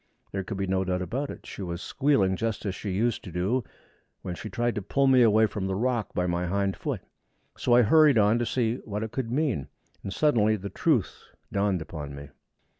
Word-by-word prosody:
There 95 0 -3
could 100 +1 -5
be 95 - -1
no 95 0 0
doubt 90 0 -1
of 90 - -9 0.2
it. - - -9
She - - -8
was 85 -2 -4
squealing 120 -7 +1
just 110 +1 -3
as 100 - -1
she 100 - -5
used 110 +5 0
to 90 - -8
do 95 +9 0 0.6
when 90 - -4
she 110 +5 -7
tried 120 0 0
to 105 - -3
pull 135 +8 +1
me 130 -2 +6
away 110 -1 +5
from 100 -3 -3
the 95 - -1
rock 120 -1 0
by 90 - +1
my 90 0 -1
hind 100 +1 0
foot. - - -4 0.5
So 120 - +2
I 125 - +7
hurried 150 +2 +6
on 105 +2 +4
to 120 - 0
see 120 -1 0
what 105 -2 -5
it 110 - -5
could 130 -4 -3
mean, 130 - 0 0.3
and 100 - -5
suddenly 110 -4 +3
the 100 -1 -6
truth - - 0 0.3
dawned 100 -4 +1
upon 75 -3 -7
me. 70 0 -9
105 Hz, 220 wpm, -27 LUFS, 95-120 Hz, 0.6 s, I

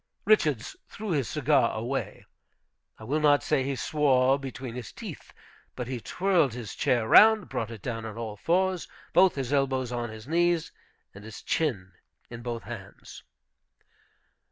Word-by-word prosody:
Richards 150 - +2
threw 215 -2 -6
his 140 -7 0
cigar 145 -5 +2
away. 125 +5 -4 0.7
I - - -13
will 140 +8 -1
not 145 -1 +4
say 135 - +1
he 135 +1 -2
swore 135 -2 +2
between 130 -2 -7
his 120 -3 -7
teeth, - - -9 0.4
but 125 -2 -5
he 130 -1 -4
twirled 175 - +1
his 120 -4 -6
chair 120 -3 +1
round, 220 - +7
brought 115 - -3
it 115 -4 -10
down 115 -2 -4
on 110 -1 -7
all 110 -2 -5
fours, 185 - 0 0.3
both 185 0 +5
his 135 -1 -3
elbows 130 -3 0
on 120 -1 -3
his 110 +2 -10
knees 170 0 +1 0.4
and 100 - -12
his 110 -1 -10
chin 110 - -1 0.4
in 120 0 -7
both 120 -1 -5
hands. 100 -4 -10
130 Hz, 155 wpm, -27 LUFS, 115-155 Hz, 0.7 s, round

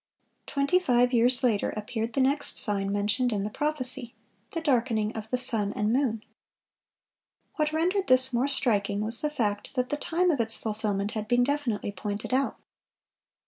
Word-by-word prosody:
Twenty 280 +6 +1
five 250 -6 +2
years 245 +2 +3
later 225 -5 +1
appeared 220 +2 -5
the 275 - +1
next 280 +2 +1
sign 200 -2 +1
mentioned 210 +5 0
in 205 -3 -2
the 210 - -4
prophecy,—the 255 - +1
darkening 235 -7 0
of 220 0 -7
the 250 - 0
sun 225 -5 +2
and 210 +2 -1
moon. 240 -5 0 1.3
What 305 -1 0
rendered 360 +5 0
this 255 0 +5
more 245 +3 +1
striking 210 -7 +1
was 225 +2 +1
the 300 - 0
fact 215 -6 -3
that 250 -1 -1
the 295 - -2
time 350 +4 0
of 285 - -2
its 225 -1 0
fulfilment 210 -2 -3
had 215 -1 -5
been 245 +2 +2
definitely 255 -7 -2
pointed 205 +4 -5
out. 270 +1 0
240 Hz, 165 wpm, -27 LUFS, 210-275 Hz, 1.3 s, this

